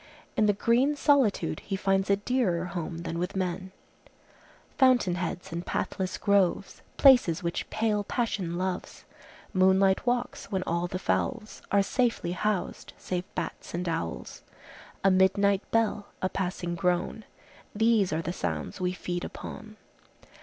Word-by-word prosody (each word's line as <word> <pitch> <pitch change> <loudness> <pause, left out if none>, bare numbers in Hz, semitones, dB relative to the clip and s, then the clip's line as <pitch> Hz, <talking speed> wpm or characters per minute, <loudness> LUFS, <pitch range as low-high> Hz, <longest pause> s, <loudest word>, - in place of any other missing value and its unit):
In 215 - +3
the 205 - +4
green 240 +8 +2
solitude 280 -7 +2
he 195 - -4
finds 195 0 +1
a 200 - +5
dearer 200 -5 0
home 170 -1 -5
than 170 -1 -3
with 180 +3 -3
men:— 185 0 -2 1.0
"Fountain 255 -9 +4
heads 180 0 -4
and 170 +1 -4
pathless 185 +1 -2
groves, 200 -3 +1 0.2
Places 245 - +6
which 170 0 -3
pale 215 -2 0
passion 195 -7 -2
loves, 185 0 -4 0.5
Moonlight 190 +3 +3
walks, 245 0 -1
when 190 -3 -2
all 170 +1 -1
the 180 - -4
fowls 215 +3 -2
Are 200 0 +4
safely 235 -4 0
housed, 200 +1 -2
save 180 -1 -3
bats - - -5
and 180 +1 -3
owls, 80 - -4 0.6
A 195 - +5
midnight 195 +1 +3
bell, 220 -2 +1
a 185 - 0
passing 180 -2 -3
groan,— 180 +5 -1 0.5
These 220 -3 +3
are 160 +1 -1
the 175 - -3
sounds 185 - -4
we 180 0 0
feed 175 -1 -4
upon." 215 0 -8
190 Hz, 140 wpm, -28 LUFS, 180-215 Hz, 1.0 s, Places